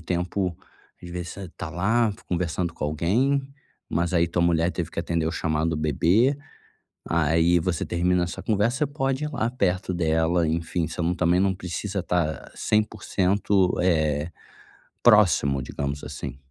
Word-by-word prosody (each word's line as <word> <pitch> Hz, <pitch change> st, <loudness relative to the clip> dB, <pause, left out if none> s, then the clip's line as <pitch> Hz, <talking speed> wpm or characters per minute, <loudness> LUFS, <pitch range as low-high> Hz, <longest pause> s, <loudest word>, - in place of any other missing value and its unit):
tempo, 90 Hz, +1 st, -2 dB, 0.5 s
às 85 Hz, -, -8 dB
vezes 90 Hz, 0 st, -5 dB
você 95 Hz, -2 st, -8 dB
tá 85 Hz, -, -5 dB
lá 105 Hz, +6 st, +1 dB, 0.2 s
conversando 85 Hz, -1 st, -1 dB
com -, -, -4 dB
alguém, 110 Hz, -, +1 dB, 0.5 s
mas 85 Hz, +1 st, 0 dB
aí 85 Hz, 0 st, +3 dB
tua 85 Hz, 0 st, 0 dB
mulher 85 Hz, 0 st, +2 dB
teve 85 Hz, -2 st, -4 dB
que -, -, -3 dB
atender 85 Hz, -1 st, -1 dB
o 80 Hz, -, -1 dB
chamado 80 Hz, 0 st, 0 dB
do 80 Hz, -, -1 dB
bebê, 85 Hz, -, +2 dB, 0.7 s
aí 85 Hz, +2 st, +3 dB
você 85 Hz, 0 st, -1 dB
termina 90 Hz, +1 st, +1 dB
sua -, -, -7 dB
conversa, 115 Hz, +6 st, +1 dB
você 150 Hz, -, +2 dB
pode 135 Hz, 0 st, -1 dB
ir 150 Hz, -, -4 dB
lá 120 Hz, -4 st, -1 dB
perto 95 Hz, -5 st, 0 dB
dela, 80 Hz, 0 st, +1 dB
enfim, 85 Hz, 0 st, -1 dB
você 85 Hz, -, -5 dB
não 85 Hz, +2 st, +1 dB
também 90 Hz, 0 st, +2 dB
não 95 Hz, 0 st, +2 dB
precisa 95 Hz, +2 st, -4 dB
tá 85 Hz, -4 st, -1 dB
100%, 100 Hz, -2 st, +1 dB
eh, 80 Hz, -3 st, +1 dB, 0.7 s
próximo, 85 Hz, -, +5 dB
digamos 70 Hz, +2 st, -4 dB
assim. -, -, -6 dB
90 Hz, 155 wpm, -25 LUFS, 80-100 Hz, 0.7 s, próximo